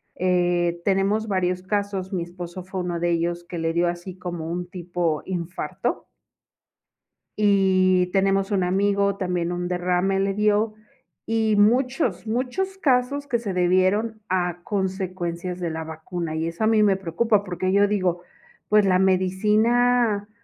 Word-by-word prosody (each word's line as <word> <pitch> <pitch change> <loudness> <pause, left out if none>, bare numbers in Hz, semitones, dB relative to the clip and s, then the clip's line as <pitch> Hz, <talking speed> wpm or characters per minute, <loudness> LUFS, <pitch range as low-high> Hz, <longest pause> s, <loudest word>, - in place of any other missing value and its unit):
Eh, 175 -1 +1
tenemos 200 +3 +1
varios 185 -2 -1
casos, 200 -1 -2
mi 180 -2 -1
esposo 175 +1 -8
fue 185 0 -5
uno 175 -1 -3
de 175 - 0
ellos 170 +1 -1
que 175 0 -7
le 165 0 -1
dio 175 +1 +2
así 175 +2 -5
como 175 -3 -5
un 175 +1 -3
tipo 175 -3 -2
infarto. 180 -1 -4 1.3
Y 190 -3 +3
tenemos 195 0 +2
un 195 -3 +1
amigo, 200 +2 +1
también 180 -3 -2
un 175 0 -3
derrame 180 +2 0
le 195 0 +1
dio, 210 +1 +2 0.5
y 220 -1 +1
muchos, 245 - +2
muchos 260 - -2
casos 280 -1 +1
que 250 -4 0
se 215 -4 -4
debieron 185 +5 +1
a 175 -1 -1
consecuencias 185 -3 -3
de 175 - -1
la 160 0 -4
vacuna. 160 +1 -5
Y 160 +1 -1
eso 170 +6 -3
a - - +3
mí 220 -1 +4
me 200 -2 +4
preocupa, 200 +4 +1
porque 185 0 -2
yo 205 0 +4
digo: 185 -4 0 0.5
"Pues, 210 -1 +5
la 185 -1 +3
medicina 210 +4 +2
185 Hz, 150 wpm, -24 LUFS, 175-210 Hz, 1.3 s, Pues